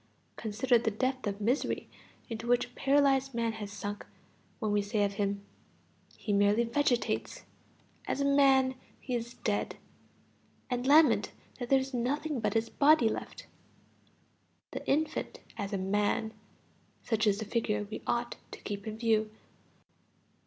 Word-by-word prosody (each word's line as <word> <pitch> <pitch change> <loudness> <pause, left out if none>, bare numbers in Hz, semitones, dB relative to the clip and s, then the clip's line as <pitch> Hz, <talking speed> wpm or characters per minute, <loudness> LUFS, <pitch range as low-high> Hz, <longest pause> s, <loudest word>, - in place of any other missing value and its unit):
Consider 230 +3 +2
the 225 - 0
depth 255 +3 -1
of 200 0 -3
misery 240 +7 0 0.4
into 230 0 -5
which 245 0 +3
a - - -17
paralyzed 270 -2 +2
man 230 -1 +1
has 210 -2 -7
sunk 205 +1 -5 0.5
when 215 -4 -1
we 205 0 +3
say 205 +1 0
of 200 0 0
him: 200 0 -1 0.7
"He 210 - -2
merely 205 +3 +4
vegetates; 250 - 0 0.6
as - - -1
a 280 - +1
man, 270 -2 +5 0.3
he 255 - -5
is 235 0 -3
dead," - - -1 1.0
and 245 +1 -1
lament 305 +2 +5 0.3
that 245 -1 -4
there 270 - +6
is 265 0 -3
nothing 280 +4 -1
but 220 - -1
his 225 0 +2
body 285 -4 +4
left. - - -6 1.3
The - - -5
infant 310 +3 0 0.2
as 200 -3 -4
a 200 - 0
man 205 +3 0 0.7
such 220 -1 +1
is 200 -1 +3
the 220 - -4
figure 210 -1 0
we 215 - -6
ought 240 0 -1 0.2
to - - -8
keep 200 0 -5
in 215 0 -4
view. 220 -2 +2
230 Hz, 150 wpm, -31 LUFS, 210-265 Hz, 1.3 s, there